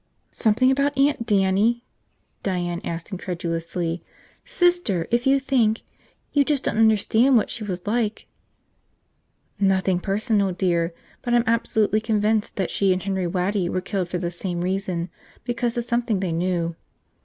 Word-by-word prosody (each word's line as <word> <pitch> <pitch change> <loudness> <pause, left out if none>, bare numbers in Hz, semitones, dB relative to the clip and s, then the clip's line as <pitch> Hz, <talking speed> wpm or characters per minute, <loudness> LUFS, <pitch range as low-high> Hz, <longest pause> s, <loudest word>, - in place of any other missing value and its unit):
"Something 245 +4 +3
about 280 +1 +1
Aunt 275 -4 +2
Dannie?" 205 +3 +2 0.6
Diane 175 -3 -2
asked 170 +3 -5
incredulously. 170 -2 -3 0.4
"Sister, 350 - +1
if 240 +2 +1
you 275 +1 +5
think... 240 -5 +1 0.5
you 285 - +5
just 280 -1 0
don't 220 - -1
understand 225 +4 +4
what 220 - 0
she 230 - -4
was 185 -3 -5
like... 220 0 -1 0.7
" - - -45 0.2
"Nothing 190 -1 +1
personal, 200 0 +1
dear. 175 -2 0 0.3
But 240 -1 0
I'm 240 - +4
absolutely 220 -2 +1
convinced 215 -1 0
that 190 -3 -2
she 195 -1 +2
and 185 0 0
Henry 190 -2 -1
Waddy 180 +1 0
were - - -1
killed 185 -1 -3
for 180 - -2
the 175 -1 -3
same 175 0 -4
reason, 185 -1 -1 0.3
because 240 -1 -2
of 240 - 0
something 235 -3 0
they 185 -3 -1
knew." 170 0 -1
205 Hz, 150 wpm, -23 LUFS, 180-235 Hz, 0.7 s, you